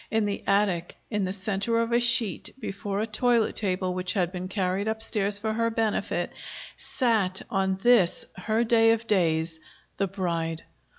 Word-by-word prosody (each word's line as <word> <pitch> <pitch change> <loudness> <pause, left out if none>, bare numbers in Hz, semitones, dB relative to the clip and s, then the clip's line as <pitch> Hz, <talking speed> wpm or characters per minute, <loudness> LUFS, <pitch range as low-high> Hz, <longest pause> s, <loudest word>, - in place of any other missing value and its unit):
In 220 -1 +1
the 205 -1 -2
attic, 195 -4 +1 0.2
in 210 -3 0
the 185 - -2
center 200 +3 -1
of 230 0 0
a 235 - +4
sheet, 235 -4 +1
before 200 -2 -3
a - - 0
toilet 230 +1 +1
table 185 -2 -1
which 185 0 -2
had 180 -3 0
been 185 0 -5
carried 190 +1 -1
upstairs 215 -2 -1
for 220 +1 -2
her 230 +1 +1
benefit, 225 -1 -1 0.4
sat, 215 -7 0
on 190 -1 +1
this 240 -8 +4
her 215 +5 0
day 225 -1 +4
of 230 0 -3
days, 165 -5 +1 0.4
the 195 - +1
bride. 170 -4 -2
200 Hz, 165 wpm, -27 LUFS, 185-225 Hz, 0.4 s, a